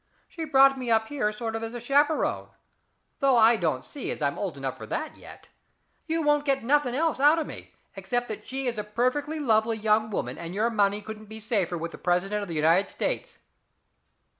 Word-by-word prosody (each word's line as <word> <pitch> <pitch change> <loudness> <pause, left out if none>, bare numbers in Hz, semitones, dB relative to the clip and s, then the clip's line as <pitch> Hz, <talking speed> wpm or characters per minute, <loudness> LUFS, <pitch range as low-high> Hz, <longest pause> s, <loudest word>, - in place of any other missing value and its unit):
She 325 -2 -6
brought 270 -2 +5
me 250 -2 -4
up 220 -1 +2
here 275 -7 -1
as 210 - -3
a - - -15
sort 225 -1 -3
of 225 +2 -4
chaperon, 290 +4 +1 0.7
though 270 -3 +4
I 230 +1 +6
don't 155 - -1
see 285 - -6
as - - -3
I'm 140 -1 -1
old 185 -8 -3
enough 135 -1 -4
for - - -10
that 310 - -4
yet. - - -14 0.6
You 325 -1 -1
don't 295 -1 +3
get 275 -3 0
nothing 270 -1 +2
else 320 -1 0
out 295 +4 +5
of 320 - -1
me - - -10 0.2
except 245 0 -2
that 215 - -7
she 270 +1 -3
is 240 -3 -1
a - - -2
perfectly 255 +8 -1
lovely 225 -4 +2
young 215 0 +2
woman, 205 - -3
and 170 +2 -6
your 225 +3 +1
money 205 -1 +1
couldn't 215 0 -9
be 220 +1 -9
safer 205 -6 -1
with 165 +1 -5
the - - -11
president 190 +4 0
of 200 - -5
the 170 - -5
United 165 +6 +3
States." - - -3
225 Hz, 215 wpm, -26 LUFS, 205-275 Hz, 0.7 s, I